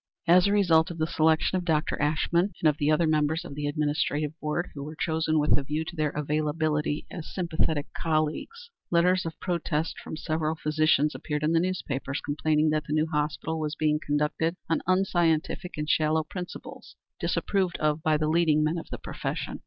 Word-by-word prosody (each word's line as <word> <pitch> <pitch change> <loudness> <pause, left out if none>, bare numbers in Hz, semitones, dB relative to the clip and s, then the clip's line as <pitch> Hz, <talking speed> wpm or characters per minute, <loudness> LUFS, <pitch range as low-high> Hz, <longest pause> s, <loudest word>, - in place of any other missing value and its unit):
As 180 +3 +6
a - - +2
result 170 -6 +4
of 170 - -7
the 155 - +1
selection 160 +3 +2
of - - -5
Dr. 160 -2 +1
Ashmun 170 +5 +1
and 160 - +3
of 150 -1 +2
the 145 0 +2
other 155 +2 +3
members 155 +2 +1
of 160 - -8
the 145 0 -3
administrative 150 0 0
board, 155 +4 -2
who 140 - -7
were 155 +2 -7
chosen 160 0 0
with 150 0 +4
a 145 - -1
view 150 +3 -2
to 175 +1 -7
their 155 -2 +1
availability 150 +1 -1
as 165 -4 -7
sympathetic 160 -4 -1
colleagues, 165 - -2 0.2
letters 180 +1 +3
of 160 - -7
protest 165 -3 -2
from 155 - -7
several 155 0 -1
physicians 150 0 +2
appeared 150 -1 -3
in 155 - +2
the 165 - +4
newspapers 145 -6 -2
complaining 155 +1 +1
that 155 -1 0
the 150 - -2
new 155 0 +2
hospital 155 +1 -2
was 150 -1 -2
being 150 0 +1
conducted 150 +3 0
on 165 - +1
unscientific 175 -3 +1
and 150 0 -3
shallow 155 0 +2
principles, 180 +3 -8 0.2
disapproved 190 -3 0
of 155 0 0
by 155 -1 +2
the 155 0 0
leading 155 -1 +3
men 155 +3 0
of - - -10
the - - -5
profession. - - -5
155 Hz, 190 wpm, -27 LUFS, 150-165 Hz, 0.2 s, As